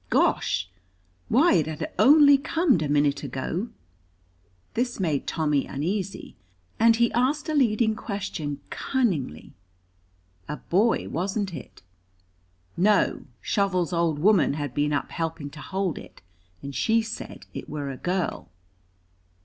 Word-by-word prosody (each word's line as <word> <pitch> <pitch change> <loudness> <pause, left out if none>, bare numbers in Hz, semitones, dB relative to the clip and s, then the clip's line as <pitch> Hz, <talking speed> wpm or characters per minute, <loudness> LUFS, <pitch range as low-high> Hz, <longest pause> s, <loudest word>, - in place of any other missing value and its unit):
Gosh! 90 - +1 0.6
Why, 280 +10 +5
it 160 -4 +2
had 155 -1 -5
only 285 0 +8
comed 320 - +2
a 150 - -1
minute 145 -1 +2
ago. 145 - -3 1.0
This 245 0 -1
made 155 -7 -1
Tommy 150 -4 0
uneasy, 185 +7 -3 0.4
and 230 0 +6
he 235 0 +2
asked 275 +6 +1
a 310 - -1
leading 230 -5 +3
question 195 - -4
cunningly. 180 - -1 1.0
A 150 - -3
boy, 210 +6 +1
wasn't 190 +2 -2
it? - - -10 0.9
No, 205 +4 +2 0.2
Shovel's 185 -4 0
old 170 -3 +1
woman 180 -3 +3
had 145 -4 -4
been 145 +2 0
up 145 - -1
helping 160 -3 -4
to 150 - -10
hold 190 -4 -2
it, - - -14 0.4
and 140 - -6
she 225 - +2
said 220 0 -7
it - - -7
were 145 -2 -4
a 130 - -7
girl. 180 +3 -2
185 Hz, 130 wpm, -25 LUFS, 150-225 Hz, 1.0 s, only